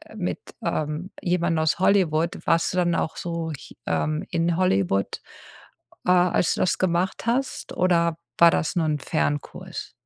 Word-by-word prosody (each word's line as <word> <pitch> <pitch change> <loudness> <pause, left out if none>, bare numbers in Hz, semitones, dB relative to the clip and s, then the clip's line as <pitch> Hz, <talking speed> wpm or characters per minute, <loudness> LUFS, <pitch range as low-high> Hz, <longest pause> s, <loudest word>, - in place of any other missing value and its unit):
mit, - - -3 0.2
ähm, 155 +5 -2
jemandem 170 -2 +1
aus 160 - +2
Hollywood. 175 -4 +2
Warst 165 +2 +2
du - - -2
dann 175 -1 +2
auch 160 - -1
so 170 -2 -3
ch - - -13
ähm, 155 +1 -1
in 170 0 +1
Hollywood, 100 - +1 0.9
äh, - - +5
als 180 -1 +3
du - - -2
das 180 - +2
gemacht 185 +2 0
hast 255 +3 -1
oder 170 -2 +2 0.2
war 170 - +9
das 160 - -1
nur 170 -2 +2
'n 150 -1 +1
Fernkurs? 75 - -3
170 Hz, 155 wpm, -24 LUFS, 155-180 Hz, 0.9 s, war